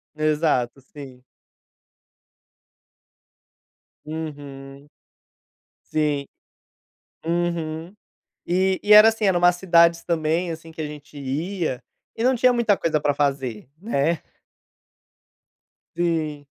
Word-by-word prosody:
Exato, 150 Hz, -5 st, 0 dB
sim. 130 Hz, -2 st, -12 dB, 2.8 s
Uhum. 145 Hz, -3 st, -8 dB, 1.1 s
Sim. 150 Hz, -2 st, 0 dB, 1.0 s
Uhum. 170 Hz, 0 st, -2 dB, 0.5 s
E 185 Hz, +1 st, +1 dB
e 210 Hz, -, +4 dB
era 210 Hz, +1 st, +10 dB
assim, 225 Hz, -1 st, -1 dB
era 190 Hz, -3 st, +3 dB
umas 175 Hz, 0 st, +4 dB
cidades 170 Hz, -2 st, +4 dB
também, 165 Hz, +1 st, 0 dB
assim, 165 Hz, 0 st, -10 dB
que 160 Hz, -, -10 dB
a 155 Hz, -, -2 dB
gente 150 Hz, 0 st, -11 dB
ia, 145 Hz, 0 st, -3 dB, 0.3 s
e 225 Hz, -, -3 dB
não 255 Hz, +1 st, +3 dB
tinha 250 Hz, +1 st, +4 dB
muita 235 Hz, -4 st, +2 dB
coisa 155 Hz, -4 st, 0 dB
pra 145 Hz, -, +1 dB
fazer, 135 Hz, -6 st, -2 dB
né? 170 Hz, -6 st, 0 dB, 1.7 s
Sim. 160 Hz, -4 st, -1 dB
160 Hz, 100 wpm, -23 LUFS, 145-175 Hz, 2.8 s, era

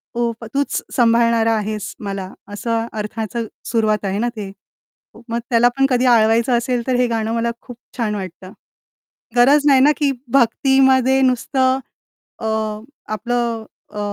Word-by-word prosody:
ओ 235 Hz, -1 st, 0 dB, 0.2 s
तूच 280 Hz, 0 st, -1 dB
सांभाळणारा 230 Hz, -1 st, +3 dB
आहेस 210 Hz, -1 st, -4 dB
मला, 195 Hz, -2 st, -5 dB, 0.2 s
असं 225 Hz, +2 st, -2 dB
अर्थाचं 220 Hz, +2 st, -4 dB, 0.2 s
सुरुवात 215 Hz, -3 st, 0 dB
आहे 195 Hz, +2 st, -1 dB
ना 240 Hz, +1 st, 0 dB
ते. 200 Hz, -2 st, -6 dB, 0.8 s
मग 235 Hz, +1 st, -1 dB
त्याला 240 Hz, 0 st, +4 dB
पण 270 Hz, -, +4 dB
कधी 250 Hz, 0 st, +2 dB
आळवायचं 235 Hz, +1 st, +4 dB
असेल, 240 Hz, 0 st, -1 dB
तर 255 Hz, -, +1 dB
हे 250 Hz, 0 st, +2 dB
गाणं 225 Hz, -1 st, -2 dB
मला 235 Hz, 0 st, 0 dB
खूप 245 Hz, -1 st, -11 dB, 0.2 s
छान 215 Hz, -3 st, -1 dB
वाटतं. 185 Hz, -1 st, -8 dB, 0.8 s
गरज 280 Hz, +4 st, +5 dB
नाही 270 Hz, -2 st, +6 dB
ना 295 Hz, +2 st, +6 dB
की 285 Hz, -2 st, +1 dB, 0.2 s
भक्तीमध्ये 265 Hz, +1 st, +3 dB
नुसतं 260 Hz, +1 st, +1 dB, 0.6 s
अ, 220 Hz, -, -6 dB, 0.7 s
आपलं 235 Hz, +1 st, -2 dB, 0.3 s
अ, 210 Hz, -, -5 dB
235 Hz, 140 wpm, -19 LUFS, 220-255 Hz, 0.8 s, नाही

